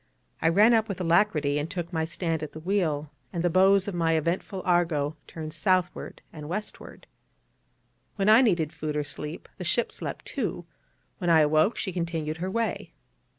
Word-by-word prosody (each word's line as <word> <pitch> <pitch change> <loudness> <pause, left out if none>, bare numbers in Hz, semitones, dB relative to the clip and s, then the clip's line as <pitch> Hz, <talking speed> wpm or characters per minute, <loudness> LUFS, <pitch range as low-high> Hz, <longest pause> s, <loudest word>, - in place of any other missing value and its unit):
I - - +4
ran 210 +7 +5
up 220 -1 +2
with 195 - -4
alacrity 165 -5 +2
and 150 +2 -3
took 175 -1 -5
my 160 -1 0
stand 165 -1 -2
at 155 - -6
the 155 - -8
wheel; 155 -5 -1 0.2
and 170 -2 -3
the 175 - +2
bows 190 +2 +4
of 205 - -3
my 165 -2 +1
eventful 170 +4 -1
Argo 165 -4 +1
turned 155 -1 -7
southward 180 +2 0
and 150 -1 -8
westward. 210 +4 -6 1.1
When 195 -1 0
I 220 +3 +8
needed 170 - +1
food 150 -1 -4
or 150 - 0
sleep, 150 +2 -7
the - - -4
ship 205 +7 +1
slept, - - -6
too: - - -3 0.5
when 175 -3 -1
I 160 -2 +6
awoke, 155 +7 +3
she 190 - -3
continued 165 -3 -3
her 180 +3 -3
way. 230 +3 -2
170 Hz, 180 wpm, -27 LUFS, 155-190 Hz, 1.1 s, I